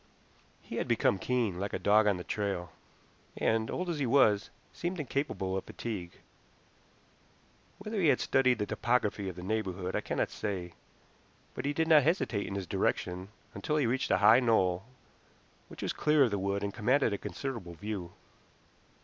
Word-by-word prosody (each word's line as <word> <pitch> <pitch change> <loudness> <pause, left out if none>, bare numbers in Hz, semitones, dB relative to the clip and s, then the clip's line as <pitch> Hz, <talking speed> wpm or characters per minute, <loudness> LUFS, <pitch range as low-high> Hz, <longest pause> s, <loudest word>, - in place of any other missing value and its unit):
He - - -6
had - - -1
become 95 - +2
keen, 115 -6 0
like 100 +1 -3
a - - 0
dog 105 +1 +4
on 100 -3 +3
the 90 - -6
trail, 95 -5 -3 0.7
and, 110 0 +1
old 180 - -3
as 170 -4 -2
he 135 - 0
was, 110 -5 +4 0.2
seemed 175 +1 -3
incapable 135 -10 -2
of 95 - -3
fatigue. 95 -7 -6 1.6
Whether 210 0 -3
he 170 - +4
had 130 - +4
studied 130 -2 +3
the 105 - -1
topography 105 -2 0
of 90 - -8
the 90 - -8
neighborhood 95 -3 -2
I - - 0
cannot - - -1
say, 90 -5 -4 0.8
but - - -5
he 145 - 0
did 160 +2 0
not 155 -2 +7
hesitate 140 - 0
in 100 - -4
his 100 -2 -3
direction 90 +2 -1 0.2
until 150 -1 -1
he 145 - +2
reached 130 +3 0
a - - +4
high 110 +5 +7
knoll 95 -6 +2 0.8
which - - -9
was - - -1
clear 150 -1 +4
of 120 - +2
the 100 - -1
wood 100 +1 -1
and 100 -1 -2
commanded 125 +1 +2
a 100 - -3
considerable 115 -11 -5
view. 100 -2 -5
110 Hz, 175 wpm, -31 LUFS, 95-135 Hz, 1.6 s, not